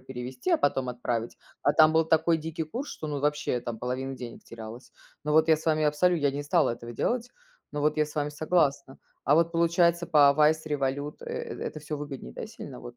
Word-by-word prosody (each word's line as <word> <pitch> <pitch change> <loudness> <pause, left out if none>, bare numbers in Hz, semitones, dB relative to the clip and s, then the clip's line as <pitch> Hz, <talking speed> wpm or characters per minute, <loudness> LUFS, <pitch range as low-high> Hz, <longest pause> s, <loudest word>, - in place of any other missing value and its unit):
перевести, 130 +3 -5
а - - +5
потом 135 -3 0
отправить, 120 -1 -3 0.3
а 145 - +3
там 155 0 +6
был 160 0 +4
такой 160 +1 +3
дикий 160 +1 -4
курс, 245 - -5
что 155 - -6
ну 145 -2 -3
вообще 150 -3 0
там 120 -1 -5
половина 130 +2 -3
денег 120 -2 -9
терялась. 115 +2 -10 0.3
Но 150 - 0
вот 160 +1 +5
я 160 - +6
с 160 - -11
вами 155 -1 +2
абсолю 175 +4 +3
я 145 -3 +1
не 145 +1 -3
стала 155 -1 +2
этого 120 0 -7
делать, 240 - -1 0.4
но 150 - -3
вот 150 +1 +1
я 150 -1 +2
с 150 - -12
вами 145 0 0
согласна. 145 -3 0 0.3
А 145 - +4
вот 165 0 +3
получается 170 0 +2
по 145 -3 +6
Wise, 155 +1 +4
Revolute 145 0 -2
э 475 - -4 0.4
это - - -9
всё 150 0 -5
выгоднее, 140 - -7
да, - - -6
сильно, - - -10
вот 120 0 -10
150 Hz, 220 wpm, -27 LUFS, 130-160 Hz, 0.4 s, там